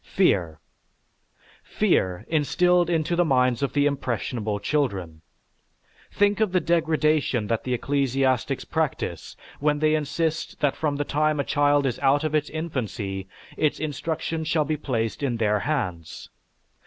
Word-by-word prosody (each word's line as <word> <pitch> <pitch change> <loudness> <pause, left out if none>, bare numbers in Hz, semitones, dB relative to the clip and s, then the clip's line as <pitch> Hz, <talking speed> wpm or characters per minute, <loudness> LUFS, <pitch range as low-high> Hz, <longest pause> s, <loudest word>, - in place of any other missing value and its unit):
Fear! 85 - +2 1.0
Fear! 90 +3 0
instilled 175 +3 +2
into 165 0 0
the 175 - +3
minds 125 -5 +2
of 140 - -1
the 145 -1 +2
impressionable 120 -6 -2
children! 100 - -2 0.9
Think 205 0 +2
of 215 -4 +2
the 185 - +4
degradation 155 -7 +1
that 115 +1 -2
the 125 -1 0
ecclesiastics 135 -2 0
practice - - -3 0.2
when 150 +1 +2
they 155 +1 +2
insist 155 +2 -2
that 145 -3 +1
from 150 -2 -1
the 145 +1 -2
time 155 +1 +1
a - - +2
child 145 0 +2
is 125 -3 -1
out 140 +2 +3
of 155 -1 -1
its 150 -1 +1
infancy 110 - -4 0.3
its 155 -2 0
instruction 160 +2 -3
shall 155 -1 +1
be 155 +2 -1
placed 120 -3 -2
in 130 -4 -1
their 105 -2 +1
hands. 95 - -4
145 Hz, 140 wpm, -25 LUFS, 120-155 Hz, 1.0 s, the